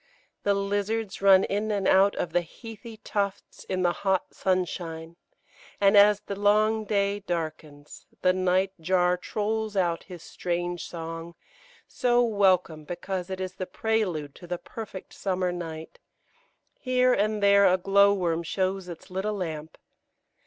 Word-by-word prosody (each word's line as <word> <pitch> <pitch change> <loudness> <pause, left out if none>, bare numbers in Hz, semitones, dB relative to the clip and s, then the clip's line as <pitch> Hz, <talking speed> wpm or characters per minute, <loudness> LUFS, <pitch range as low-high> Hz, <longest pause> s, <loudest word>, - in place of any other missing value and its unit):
The 200 0 +2
lizards 205 +1 -2
run 195 -1 +7
in 210 +2 -1
and 200 -2 0
out 195 +1 +5
of 165 - -3
the 175 - +3
heathy 225 +5 -11
tufts 200 -2 -4
in 185 -1 -2
the 175 - +3
hot 190 -2 0
sunshine, 170 -3 -2 0.6
and 200 +1 +4
as 205 0 +6
the 200 - -6
long 215 +2 +2
day 200 0 0
darkens 155 -5 -6 0.2
the 185 - +5
night 185 +1 +1
jar 180 +1 +2
trolls 215 +3 -3
out 175 -3 +1
his 175 -3 -10
strange 175 0 -3
song, 165 0 -7 0.5
so 245 0 +2
welcome 190 -8 +2
because 180 +3 -5
it 190 0 -4
is 185 -1 -4
the 185 -1 -5
prelude 180 -10 -1
to 175 - -13
the 175 0 -3
perfect 205 -1 -9
summer 185 -2 -1
night; 165 -2 -7 0.8
here 255 -1 +2
and 210 0 0
there 200 -1 +6
a 185 - +3
glowworm 195 -3 +3
shows 185 +2 -2
its 170 +1 -10
little 200 +3 -2
lamp. 160 -5 -5
190 Hz, 145 wpm, -27 LUFS, 175-205 Hz, 0.8 s, run